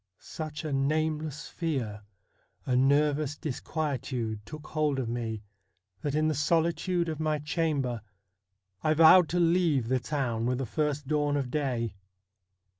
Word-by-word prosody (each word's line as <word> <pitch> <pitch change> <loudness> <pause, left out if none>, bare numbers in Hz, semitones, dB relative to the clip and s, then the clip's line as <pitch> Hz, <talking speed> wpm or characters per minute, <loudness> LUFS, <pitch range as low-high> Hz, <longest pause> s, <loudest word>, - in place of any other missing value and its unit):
Such 155 0 -6
a 150 - -2
nameless 155 +2 -1
fear, 130 -11 -3 0.6
a 125 - +1
nervous 145 +2 +2
dis 150 -5 -4
quietude, 130 -8 -2
took 155 0 -9
hold 150 -3 0
of 130 -3 -1
me, 115 -2 -3 0.6
that 145 -1 -2
in 155 0 +2
the 155 - +2
solitude 170 +4 +1
of 160 -2 -3
my 155 -1 +1
chamber 145 -6 -1 0.8
I 155 0 +2
vowed 165 +2 +7
to 175 - 0
leave 165 -8 +2
the 130 0 +2
town 120 -4 -1
with 125 0 +1
the 135 - -2
first 150 +2 -1
dawn 145 -1 +1
of 130 -3 -2
day. 125 -7 -1
150 Hz, 145 wpm, -29 LUFS, 130-155 Hz, 0.8 s, vowed